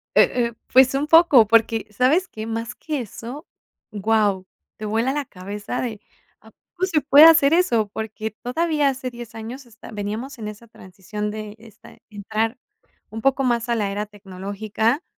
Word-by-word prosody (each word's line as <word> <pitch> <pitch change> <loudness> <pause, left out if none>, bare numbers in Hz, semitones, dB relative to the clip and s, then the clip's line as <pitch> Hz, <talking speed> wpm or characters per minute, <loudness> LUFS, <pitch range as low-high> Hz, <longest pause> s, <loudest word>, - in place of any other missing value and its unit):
E 245 -2 +4
eh, - - -14 0.2
pues 260 +1 +6
un 285 +2 -1
poco, 305 -9 +6
porque, 225 0 +2
¿sabes 265 - +2
qué?, 220 0 -7
más 230 +1 -4
que 300 -5 -4
eso, 240 - -9 0.4
guau, 205 -2 +1 0.3
te 215 - -6
vuela 225 +5 0
la 290 0 -2
cabeza 205 +4 -6
de, 220 -4 -5 0.4
¿cómo 370 +1 -6
se 315 -5 +1
puede 290 +2 +8
hacer 325 -2 +6
eso?, 235 - +2
porque 220 0 -5
todavía 295 +6 0
hace 260 -1 -4
10 240 -2 -10
años, 235 +4 -8
esta 230 -2 -14
veníamos 220 +6 -5
en 215 - -6
esa 215 +2 -12
transición 210 +1 -7
de 215 -1 -7
esta 220 -2 -17
entrar 220 +4 -3 0.5
un 225 +1 -7
poco 270 0 +2
más 240 -1 0
a 235 - +2
la 205 -3 -1
era 205 +1 -3
tecnológica 205 - -3
225 Hz, 165 wpm, -22 LUFS, 210-265 Hz, 0.5 s, puede